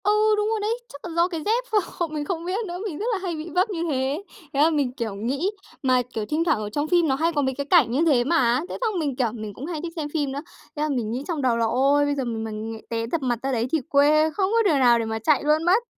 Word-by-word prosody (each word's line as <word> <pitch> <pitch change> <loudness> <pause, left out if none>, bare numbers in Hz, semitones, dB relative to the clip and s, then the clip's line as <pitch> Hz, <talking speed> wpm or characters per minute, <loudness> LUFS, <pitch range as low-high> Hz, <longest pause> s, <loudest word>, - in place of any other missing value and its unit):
Ừ, 410 - +3 0.3
đúng 420 +1 +1
rồi 445 -1 0
đấy, 440 +3 0
chắc 285 - -11
là 350 - -5
do 340 +1 +4
cái 335 -4 -4
dép 465 +4 +2
ph 415 -5 -1
mình 300 -1 -3
không 335 0 -3
biết 390 +5 -2
nữa, 350 0 -5
mình 345 -8 -4
rất 430 - -2
là - - +1
hay 350 -3 -2
bị 315 +2 -6
vấp 365 +6 +1
như 340 -5 -2
thế. 270 +3 -1 0.3
Thế 275 - -1
là 315 - +6
mình, 290 -5 0
kiểu, 230 -5 -4
nghĩ 270 - -1 0.3
mà, 255 -1 +3
kiểu, 220 -2 -2
thỉnh 305 +7 0
thoảng 325 -9 +2
ở 210 -1 -4
trong 290 +8 -2
phim 345 -1 +3
nó 265 - +2
hay 325 +4 +1
có 290 - +2
mấy 265 -1 0
cái 280 - -3
cảnh 300 -7 +4
như 265 +6 +1
thế 270 -7 +4
mà. 255 -4 +2
Thế - - -4
xong 435 -6 0
mình, 285 -5 -1
kiểu, 250 -2 +1
mình 215 -2 -7
cũng 255 - -7
hay 320 -2 -4
thích 335 0 -6
xem 305 -3 -3
phim 290 -4 0
nữa, 280 +1 -4 0.3
thế 295 - -4
là 305 - 0
mình 240 -6 -1
nghĩ 250 +4 -3
trong 330 -5 -2
đầu 245 -3 +2
là 230 - +2
"Ôi! 275 +5 +3
Bây 290 0 0
giờ 275 - -1
mình 225 -2 -3
mà 220 - -5
nghè 220 +1 -6
té 230 0 -2
dập 330 - 0
mặt 245 -3 -1
ra 270 - 0
đấy 235 -1 0
thì 320 - +1
quê 300 +2 +4
không 390 +2 0
có 460 0 +3
đường 295 -4 +3
nào 240 -2 +5
để 230 - -1
mà 220 0 -3
chạy 285 +5 +2
luôn 305 +2 +2
mất." 380 +7 +3
290 Hz, 310 wpm, -24 LUFS, 250-340 Hz, 0.3 s, là